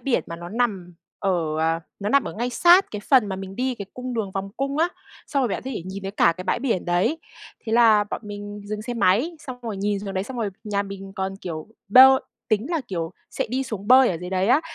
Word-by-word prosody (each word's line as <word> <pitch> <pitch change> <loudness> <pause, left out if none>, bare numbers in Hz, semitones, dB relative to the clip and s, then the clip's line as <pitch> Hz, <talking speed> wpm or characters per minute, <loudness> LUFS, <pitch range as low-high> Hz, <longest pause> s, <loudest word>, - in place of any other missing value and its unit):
biển 270 -3 0
mà 170 - -6
nó 170 +1 -8
nằm 200 -6 -2 0.2
ở, 195 - 0 0.3
ờ, 165 +1 +1 0.2
nó 200 - -1
nằm 280 +4 +3
ở - - -5
ngay 240 +3 -2
sát 350 +9 +5
cái 210 - -5
phần 250 -1 +4
mà 190 - -3
mình 195 0 -8
đi 255 0 0
cái 200 -3 -7
cung 250 0 -5
đường 215 -4 -2
vòng 195 0 -3
cung 275 +2 -2
á. 335 +2 +3 0.4
Xong 280 - 0
rồi 245 - +1
bạn - - -3
có 265 - -4
thể 215 - -4
nhìn 190 +1 -6
thấy 195 - -4
cả 170 -4 +3
cái 185 - -7
bãi 185 - 0
biển 235 -8 -1
đấy. 175 - +1 0.5
Thế 220 - -2
là 225 -3 +6
bọn - - -3
mình 205 0 -7
dừng 210 +1 -5
xe 245 +2 -4
máy, 235 - +2
xong 255 -4 -8
rồi 220 -4 -4
nhìn 205 +1 -1
xuống 195 -1 -6
đấy, 190 +1 -1
xong 260 +3 -7
rồi 220 -4 -1
nhà 200 -1 0
mình 195 -1 -8
còn, 190 0 -3
kiểu, 165 -5 -6 0.2
bơi 265 +4 +8 0.3
tính 215 +2 +1
là, 330 - 0
kiểu, 170 -2 -3 0.2
sẽ - - -2
đi 260 +2 0
xuống 210 -6 -6
bơi 255 0 +7
ở 175 - -1
dưới 180 - -6
đấy 190 +1 +1
á. 285 +5 +5
205 Hz, 260 wpm, -24 LUFS, 195-250 Hz, 0.5 s, bơi